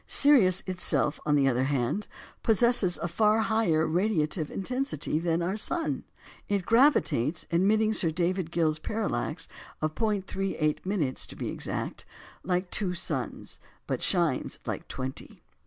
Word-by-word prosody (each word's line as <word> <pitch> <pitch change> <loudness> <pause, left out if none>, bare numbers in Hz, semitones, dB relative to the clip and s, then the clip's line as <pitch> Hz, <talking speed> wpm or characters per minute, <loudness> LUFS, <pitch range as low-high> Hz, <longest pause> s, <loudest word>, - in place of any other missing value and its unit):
Sirius 225 -11 +6
itself, 170 -6 +2
on 150 - +3
the 140 -2 +3
other 130 0 +1
hand, 140 - -1 0.3
possesses 225 -4 +3
a 170 - -3
far 210 +5 +2
higher 220 -9 +2
radiative 160 -3 0
intensity 250 - -2
than 170 0 0
our 185 +4 -1
sun. 325 +9 -2 0.4
It 200 -3 0
gravitates 230 - +3
admitting 215 +5 +3
Sir 175 -6 +2
David 175 +1 -1
Gill's 160 -2 0
parallax 200 -5 -2 0.3
of 155 0 -1
0·38" 190 - -1
to - - -9
be - - -4
exact - - -5 0.4
like 180 +1 -2
two 185 -4 0
suns, 155 -7 -4 0.3
but - - -3
shines - - 0
like - - -5
twenty. 130 0 -7
180 Hz, 130 wpm, -28 LUFS, 155-210 Hz, 0.4 s, Sirius